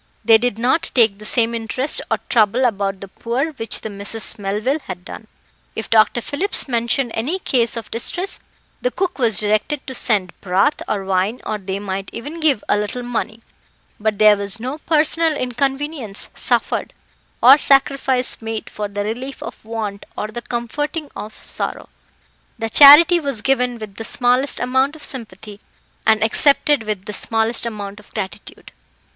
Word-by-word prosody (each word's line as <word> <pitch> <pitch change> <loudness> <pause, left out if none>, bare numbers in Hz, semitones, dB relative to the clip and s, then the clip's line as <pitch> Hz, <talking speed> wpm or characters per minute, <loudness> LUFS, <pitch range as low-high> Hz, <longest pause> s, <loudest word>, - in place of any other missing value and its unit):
They 225 -1 +7
did 245 -2 -1
not 250 +8 +1
take 220 -5 +4
the 215 - -10
same 230 0 +2
interest 235 +5 -1
or - - +1
trouble 230 +2 +3
about 200 -4 -1
the 195 - -7
poor 245 +10 -3
which 225 -7 -3
the 220 - -5
Misses 205 +2 -1
Melville 210 +9 -1
had 180 -1 -7
done. 220 - -10 0.5
If 220 - -6
Dr. 225 +2 +4
Phillips 340 - 0
mentioned 240 +1 0
any 280 +12 -1
case 245 -10 0
of 230 - -7
distress, 350 +11 -1 0.4
the - - +1
cook 370 - -3
was 225 -6 +3
directed 215 +7 0
to 265 - -6
send 205 -7 0
broth, 195 +11 +1
or 200 -2 -2
wine, 195 +5 0
or 215 - -3
they 190 0 -4
might 195 -1 -5
even 295 +8 -7
give 295 -9 +2
a 205 - +2
little 210 +4 -3
money; 230 -2 -4 0.6
but 215 -1 -1
there 215 0 +6
was 200 +1 -3
no 260 +6 -5
personal 315 0 +1
inconvenience 270 -2 -2
suffered - - -1 0.5
or 265 +5 +8
sacrifice 270 -3 +2
made 225 -1 -5
for 210 -1 -4
the 205 0 -4
relief 245 +6 -5
of - - -9
want 215 -3 -5
or 210 - -3
the 240 +2 -6
comforting 295 +7 -4
of 215 +1 -8
sorrow. - - -4 0.7
The 225 -1 -4
charity 310 +5 +9
was 275 -9 -3
given 250 -2 +1
with 210 -3 -10
the 225 - -5
smallest 250 +4 +1
amount 260 +4 +1
of 315 - -12
sympathy, 215 -4 -6 0.5
and 220 0 +4
accepted 285 +4 +3
with 210 -3 -4
the 210 - -6
smallest 225 +3 0
amount 205 -2 -6
of 210 - -19
gratitude. 195 -3 -7
230 Hz, 165 wpm, -19 LUFS, 210-270 Hz, 0.7 s, charity